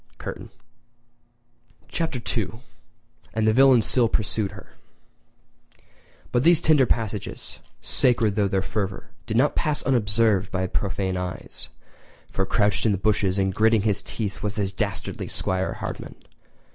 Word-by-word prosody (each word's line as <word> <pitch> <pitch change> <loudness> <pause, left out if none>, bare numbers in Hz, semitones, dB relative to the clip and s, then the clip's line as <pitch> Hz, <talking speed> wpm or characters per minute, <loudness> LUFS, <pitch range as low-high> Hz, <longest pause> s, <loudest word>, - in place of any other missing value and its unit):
[Curtain] - - -7 1.4
Chapter 160 -5 -2 0.2
II: 115 0 -3 0.7
And 110 -1 +1
the 110 - +4
Villain 130 -2 +6
Still 120 +1 +3
Pursued 105 -2 -1
Her[edit] 95 - -13 1.6
But 120 - +2
these 165 +3 +5
tender 150 -6 +4
passages, 110 -4 -3 0.2
sacred 120 -4 +2
though 100 -1 +1
their 95 -1 0
fervour, 95 -2 -4 0.2
did 110 - -1
not 135 +4 +3
pass 150 -1 0
unobserved 105 -5 +2
by 95 0 -1
profane 95 0 -2
eyes; 90 -1 -6 0.6
for 95 0 -1
crouched 105 -3 +1
in 105 - +3
the - - 0
bushes 100 -1 +1
and 95 -1 +1
gritting 110 +1 +3
his 105 -2 +1
teeth 105 -3 -4
was 105 -1 -3
the 105 - 0
dastardly 95 - -3
'Squire 95 0 -1
Hardman! - - -6
105 Hz, 135 wpm, -24 LUFS, 95-115 Hz, 1.6 s, Villain